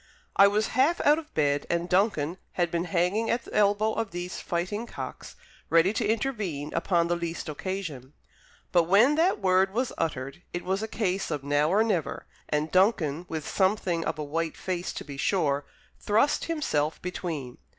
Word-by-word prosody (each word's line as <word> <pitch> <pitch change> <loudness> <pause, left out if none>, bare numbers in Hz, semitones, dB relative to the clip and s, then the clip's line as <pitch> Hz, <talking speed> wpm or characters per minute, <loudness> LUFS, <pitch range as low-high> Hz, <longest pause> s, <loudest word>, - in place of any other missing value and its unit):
I 200 - +8
was 210 +2 +1
half 290 +7 +2
out 295 +2 +5
of 310 - -12
bed, 145 -2 +1
and 170 0 0
Duncan 180 -3 +1
had 175 -2 0
been 170 0 -1
hanging 180 +6 +1
at 235 0 0
the - - -11
elbow 210 +1 +3
of 225 -1 -2
these 175 0 -5
fighting 190 +7 -3
cocks, - - -8 0.3
ready 165 +4 +4
to - - 0
intervene 205 - -2
upon 170 0 +2
the 175 - +1
least 170 -1 -4
occasion. 155 -5 -5 0.6
But 175 -2 +4
when 210 - +5
that 335 +5 +2
word 190 0 +2
was 250 +1 0
uttered, 140 0 -3
it 175 - -3
was 190 +2 0
a 220 - -2
case 195 -3 -1
of 150 -4 -3
now 145 +2 +2
or 205 +5 +4
never; 180 -9 -1 0.2
and 150 +1 0
Duncan, 180 -5 +2
with 160 -2 -4
something 190 -4 +1
of - - -2
a 155 - -3
white 160 +2 -2
face 180 -1 -3
to - - -6
be 140 -2 -8
sure, 145 -3 +1 0.3
thrust 220 +8 +2
himself 160 - -1
between. 165 -8 -5
180 Hz, 180 wpm, -27 LUFS, 160-210 Hz, 0.6 s, I